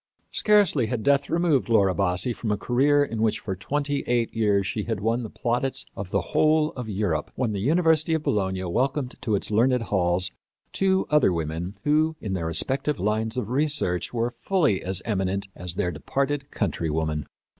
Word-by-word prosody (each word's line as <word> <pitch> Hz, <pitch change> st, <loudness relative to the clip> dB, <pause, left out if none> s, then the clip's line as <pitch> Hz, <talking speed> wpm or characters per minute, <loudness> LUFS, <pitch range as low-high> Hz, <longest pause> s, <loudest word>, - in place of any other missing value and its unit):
Scarcely 200 Hz, -, +3 dB
had 115 Hz, -1 st, -3 dB
death 140 Hz, 0 st, +2 dB
removed 165 Hz, -7 st, +1 dB
Laura 100 Hz, -5 st, +4 dB
Bassi 90 Hz, +4 st, 0 dB
from 115 Hz, -, -5 dB
a 105 Hz, -, +1 dB
career 145 Hz, +6 st, +3 dB
in 115 Hz, -6 st, -3 dB
which 110 Hz, -1 st, +2 dB
for 95 Hz, -3 st, -5 dB
twenty 145 Hz, +8 st, -2 dB
eight 120 Hz, -1 st, 0 dB
years 105 Hz, -3 st, +2 dB
she 105 Hz, +2 st, -3 dB
had 115 Hz, -3 st, -2 dB
won 115 Hz, +4 st, 0 dB
the 110 Hz, -, -6 dB
plaudits 125 Hz, +5 st, -1 dB
of 95 Hz, -2 st, -6 dB
the 100 Hz, 0 st, +1 dB
whole 155 Hz, 0 st, +3 dB
of 125 Hz, -7 st, -7 dB
Europe, 95 Hz, -7 st, -1 dB
when 125 Hz, -4 st, -1 dB
the 100 Hz, -, -2 dB
University 160 Hz, -, +3 dB
of 160 Hz, -, -2 dB
Bologna 95 Hz, -5 st, -1 dB
welcomed 130 Hz, -, -1 dB
to 115 Hz, -4 st, 0 dB
its 100 Hz, -, -2 dB
learned 120 Hz, +3 st, +3 dB
halls 95 Hz, -2 st, 0 dB, 0.4 s
two 190 Hz, 0 st, +2 dB
other 150 Hz, -10 st, +4 dB
women 85 Hz, +3 st, -3 dB
who, 155 Hz, +2 st, +2 dB
in 100 Hz, -3 st, -4 dB
their 85 Hz, -3 st, -2 dB
respective 135 Hz, -, 0 dB
lines 110 Hz, +3 st, -1 dB
of 115 Hz, -4 st, -2 dB
research, 130 Hz, -, +1 dB
were 120 Hz, 0 st, -1 dB
fully 165 Hz, -, +1 dB
as 95 Hz, -1 st, -3 dB
eminent 100 Hz, -2 st, -1 dB
as 90 Hz, -1 st, -5 dB
their 90 Hz, -2 st, 0 dB
departed 140 Hz, -, -2 dB
countrywoman. 80 Hz, -, -2 dB
115 Hz, 180 wpm, -25 LUFS, 95-140 Hz, 0.4 s, Laura